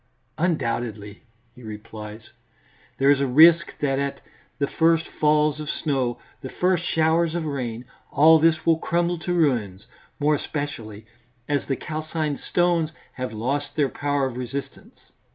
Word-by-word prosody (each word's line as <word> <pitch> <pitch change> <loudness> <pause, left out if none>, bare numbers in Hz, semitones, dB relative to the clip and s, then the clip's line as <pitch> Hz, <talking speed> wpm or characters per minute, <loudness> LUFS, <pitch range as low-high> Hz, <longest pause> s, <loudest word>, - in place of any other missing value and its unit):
"Undoubtedly," 115 - -2 0.3
he 125 - -16
replies, 110 0 -9 0.7
"there 135 +1 +4
is 140 -1 +3
a 140 - +1
risk 160 +6 +6
that 135 -2 +1
at 140 0 -2 0.4
the 140 - +1
first 165 +2 +2
falls 150 0 +2
of 150 -1 -6
snow, 135 -7 -1 0.2
the 130 - -6
first 180 +1 +1
showers 160 0 +1
of 170 -2 -2
rain, 125 -5 -4 0.3
all 160 +2 +6
this 160 0 +2
will 165 -1 +3
crumble 170 +1 0
to 175 - -4
ruins, 120 - 0 0.3
more 150 +1 +3
especially 120 -8 -5 0.4
as 145 -1 -1
the 135 - 0
calcined 155 -1 -3
stones 175 -3 +1 0.2
have 130 -3 -4
lost 135 +7 -3
their 145 -3 +2
power 145 0 -1
of 130 -2 -4
resistance. 130 +2 -7
145 Hz, 145 wpm, -24 LUFS, 125-160 Hz, 0.7 s, risk